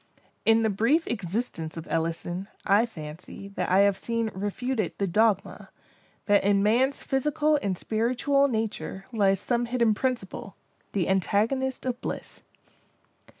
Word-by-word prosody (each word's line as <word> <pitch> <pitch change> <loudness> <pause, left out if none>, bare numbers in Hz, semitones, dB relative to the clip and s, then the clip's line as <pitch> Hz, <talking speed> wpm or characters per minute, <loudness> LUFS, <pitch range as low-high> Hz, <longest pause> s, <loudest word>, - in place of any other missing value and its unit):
In 225 0 +6
the 220 - +2
brief 240 - +2
existence 190 -5 -3
of 165 - -6
Ellison, 165 +3 -2 0.2
I 210 +4 +4
fancy, 165 +1 -9
that 200 - -3
I 185 +2 +5
have 200 -1 +4
seen 230 +1 -2
refuted 205 +1 -2
the 200 - 0
dogma—that 205 +1 -1
in 200 0 +3
man's 250 +6 +2
physical 300 +2 +1
and 190 -3 -1
spiritual 250 +7 +1
nature, 220 -5 -3
lies 195 -3 +3
some 240 +3 0
hidden 235 -2 +2
principle, 210 -5 -3 0.4
the 190 -4 0
antagonist 225 +8 +1
of 250 -1 -2
Bliss. - - -6
215 Hz, 130 wpm, -27 LUFS, 195-245 Hz, 0.4 s, In